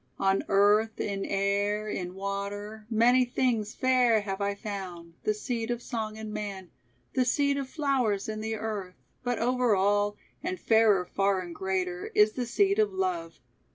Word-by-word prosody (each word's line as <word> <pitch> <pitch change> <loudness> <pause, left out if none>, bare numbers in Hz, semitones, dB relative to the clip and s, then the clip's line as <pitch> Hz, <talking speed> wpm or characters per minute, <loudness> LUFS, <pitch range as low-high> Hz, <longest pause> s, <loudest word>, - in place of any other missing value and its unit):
On 195 0 +2
earth, 205 +3 +3
in 200 -1 -2
air, 200 +2 0
in 180 -3 -4
water, 200 +2 -5
many 240 +3 +5
things 240 -4 0
Fair 250 -4 +3
have 195 -1 -4
I 200 0 0
found, 185 -5 -7
the 215 - +3
seed 230 +1 -3
of 240 -1 -1
song 220 -3 -4
in 220 -1 -7
man, 200 -4 -5 0.4
The 255 - +3
seed 280 +3 +2
of 275 -2 -3
flowers 260 -10 0
in 215 0 -4
the 220 0 -2
earth, 205 -4 -4 0.3
but 245 -2 0
over 245 -1 +2
all, 205 +2 +2 0.2
And 185 - -3
fairer 220 -4 +4
far 195 +1 +1
and 175 -2 -7
greater, 185 -1 -2
is 210 +1 +6
the 245 +1 -3
seed 200 -3 +2
Of 210 -2 +3
love. 180 -3 -2
210 Hz, 165 wpm, -28 LUFS, 195-225 Hz, 0.4 s, is